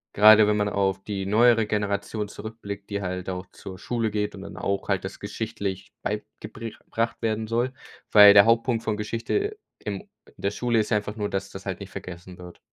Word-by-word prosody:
Gerade 110 +1 +8
wenn 105 0 +2
man 105 -1 +1
auf 95 -1 0
die 95 -1 -4
neuere 115 +2 +4
Generation 105 0 -2
zurückblickt, 100 -1 -8
die 100 -1 -2
halt 90 -1 -4
auch 90 0 -4
zur 95 -1 -9
Schule 115 -1 -1
geht 105 -1 -2
und 95 - -9
dann 100 0 -9
auch 100 +1 -2
halt 95 -1 0
das 95 - -8
geschichtlich 100 -2 -4
beigebri 105 +2 -6
gebracht 115 0 -2
werden 110 -1 -1
soll, 120 +3 0 0.4
weil 105 -1 +10
der 100 -1 +9
Hauptpunkt 115 0 +2
von 110 -2 -1
Geschichte 115 - -2 0.2
im 100 -2 -5 0.3
in - - -14
der 100 - +1
Schule 120 +2 0
ist 105 - -1
einfach 105 0 0
nur, 105 -2 -2
dass 95 0 -2
das - - -10
halt - - -4
nicht - - -8
vergessen 90 0 -9
wird. 90 -1 -11
105 Hz, 200 wpm, -25 LUFS, 100-110 Hz, 0.4 s, weil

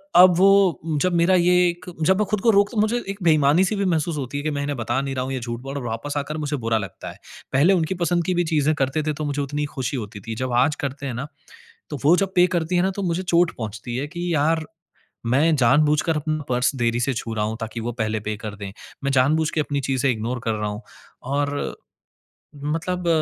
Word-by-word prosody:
अब 180 0 +8
वो 195 -2 +5 0.2
जब 185 -1 +1
मेरा 170 +2 +4
ये 180 0 +4 0.2
एक 175 +1 -7 0.2
जब 190 +2 +4
मैं 210 - +2
खुद 210 -2 0
को 230 - +3
रोकता 205 +2 +2
मुझे 220 +3 +1
एक 195 +1 -5
बेईमानी-सी 160 +4 +4
भी 200 -1 0
महसूस 165 -2 0
होती 140 0 -4
है 145 - -5
कि 155 - 0
मैं 145 -1 -2
इन्हें 145 0 -2
बता 120 +2 -1
नहीं 135 -1 -4
रहा 130 - -1
हूँ 135 - -4
ये 130 - -2
झूठ 120 0 -5
बोल 135 +2 -7
र 140 - -4
वापस 120 +5 -4
आकर 150 +2 -3
मुझे 150 -1 -2
बुरा 115 -2 0
लगता 100 -3 -7
है। - - -16 0.3
पहले 150 +9 +5
उनकी 175 0 0
पसंद 175 0 +1
की 185 - 0
भी 175 - +2
चीज़ें 155 -2 +2
करते 140 +2 0
थे 155 0 -1
तो 155 +1 -4
मुझे 145 0 -2
उतनी 145 +1 -2
खुशी 135 -2 -4
होती 105 -2 -6
थी। 115 - -3
जब 130 +2 -3
आज 140 +5 +3
करते 140 0 -4
हैं 130 - -3
ना 125 +5 -4 0.6
तो 150 - -4
वो 165 - +7
जब 195 0 0
पे 180 0 +6
करती 170 +1 0
है 175 - +4
ना 190 - +1
तो 200 - -3
मुझे 175 0 -1
चोट 175 -1 +3
पहुँचती 110 +2 -5
है, 140 +3 -2
कि 175 +2 -3
यार 160 +1 +1 0.6
मैं 145 +7 +3
जानबूझकर 150 +5 +3
अपना 155 0 -2
पर्स 125 +3 +1
देरी 120 -1 0
से 130 +2 0
छू 115 -1 -4
रहा 105 -1 -1
हूँ 110 +1 -3
ताकि 115 +1 -5
वो 115 +2 -3
पहले 110 0 -1
पे 110 - -1
कर 105 -1 -5
दें। 100 -1 -7 0.3
मैं 140 - 0
जानबूझके 155 +4 +2
अपनी 145 -1 -2
चीज़ें 135 0 0
इग्नोर 120 +2 -3
कर 115 - 0
रहा 105 -1 -2
हूँ। 105 +2 -6 0.4
और 145 +2 -2 0.9
मतलब 170 +4 -2
145 Hz, 240 wpm, -23 LUFS, 125-170 Hz, 0.9 s, अब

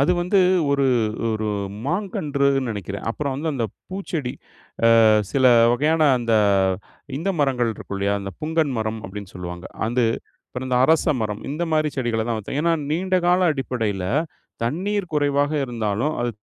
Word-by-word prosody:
அது 145 +6 +4
வந்து 180 +3 +2 0.3
ஒரு, 140 -1 +2 0.5
ஒரு 110 0 -2 0.4
மாங்கன்றுன்னு 140 - 0
நினைக்கிறேன். 100 -2 -5
அப்புறம் 140 +2 -3
வந்து 150 +4 -3
அந்த 125 -5 -1 0.2
பூச்செடி, 170 -9 -4 0.7
ஆ - - +6 0.3
சில 135 -1 +2 0.3
வகையான 155 +6 +2 0.2
அந்த 115 -1 -1 0.8
இந்த 170 +7 -1
மரங்கள் 125 -4 +1
இருக்கும் 100 - -7
இல்லையா? 100 +1 +1
அந்த 100 0 -5
"புங்கன் 155 -2 0
மரம்" 110 0 -2
அப்டின்னு 100 0 -8
சொல்வாங்க. 90 0 -7 0.2
அது 120 +2 +1 0.4
அப்றம் 125 +1 -6
இந்த 125 - +1
அரச 160 +1 +3
மரம், 105 -1 -3
இந்த 155 +4 -3
மாரி 155 -1 +2
செடிகள 115 -3 0
தான் 115 -2 0
வச்சோம். 110 +6 -4
ஏன்னா 170 - +3 0.2
நீண்டகால 180 +1 +2
அடிப்படையில 115 -9 -2 0.6
தண்ணீர் 185 - -2
குறைவாக 145 0 +1
இருந்தாலும், 115 +3 -1
அது 120 0 0
135 Hz, 145 wpm, -22 LUFS, 110-155 Hz, 0.8 s, ஆ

